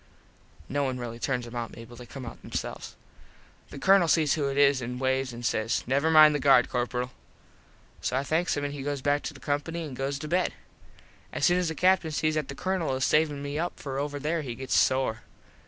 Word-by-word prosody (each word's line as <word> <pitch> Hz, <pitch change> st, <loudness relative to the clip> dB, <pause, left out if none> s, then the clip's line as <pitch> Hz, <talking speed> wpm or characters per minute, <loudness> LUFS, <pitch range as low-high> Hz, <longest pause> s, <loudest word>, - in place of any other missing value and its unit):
(No 145 Hz, +2 st, -1 dB
one 130 Hz, -2 st, -1 dB
really 120 Hz, -1 st, -6 dB
turns 125 Hz, -1 st, -1 dB
em 120 Hz, -, -10 dB
out, 120 Hz, -1 st, -4 dB
Mable. 115 Hz, +1 st, -11 dB
They 120 Hz, 0 st, -11 dB
come 135 Hz, 0 st, -8 dB
out 115 Hz, -, -9 dB
themselves.) -, -, -5 dB, 0.7 s
The -, -, -9 dB
Colonel 190 Hz, +3 st, +5 dB
sees 155 Hz, -3 st, +3 dB
who 145 Hz, -3 st, 0 dB
it 140 Hz, 0 st, -3 dB
is 140 Hz, -2 st, +4 dB
an 125 Hz, +1 st, -4 dB
waves 130 Hz, 0 st, 0 dB
an 120 Hz, 0 st, -9 dB
says 115 Hz, -1 st, 0 dB
"Never 140 Hz, +5 st, +1 dB
mind 155 Hz, -1 st, +8 dB
the 145 Hz, -, 0 dB
guard, 135 Hz, -3 st, +5 dB
Corperal." 125 Hz, 0 st, -2 dB, 0.9 s
So 130 Hz, -, -1 dB
I 135 Hz, -, 0 dB
thanks 160 Hz, +5 st, 0 dB
him 145 Hz, -, -1 dB
an 145 Hz, -1 st, -5 dB
goes 140 Hz, -1 st, -3 dB
back 145 Hz, 0 st, +2 dB
to -, -, -5 dB
the -, -, -12 dB
company 145 Hz, +5 st, -2 dB
an 150 Hz, -4 st, -7 dB
goes 135 Hz, +2 st, -2 dB
to 150 Hz, -, -6 dB
bed. 180 Hz, +3 st, 0 dB, 0.8 s
As -, -, 0 dB
soon 175 Hz, 0 st, +4 dB
as 180 Hz, -, 0 dB
the 160 Hz, -, -3 dB
Captin 185 Hz, -1 st, +3 dB
sees 155 Hz, 0 st, 0 dB
that 155 Hz, -3 st, -1 dB
the 140 Hz, -, -7 dB
Colonel 175 Hz, -4 st, -1 dB
is 130 Hz, -, 0 dB
savin 150 Hz, -2 st, +2 dB
me 145 Hz, +1 st, -3 dB
up 175 Hz, +2 st, -3 dB
for 135 Hz, -1 st, -4 dB
over 145 Hz, 0 st, -3 dB
there 155 Hz, +3 st, -1 dB
he 125 Hz, -5 st, -5 dB
gets 130 Hz, +2 st, -4 dB
sore. 130 Hz, -4 st, +2 dB
140 Hz, 225 wpm, -27 LUFS, 130-155 Hz, 0.9 s, mind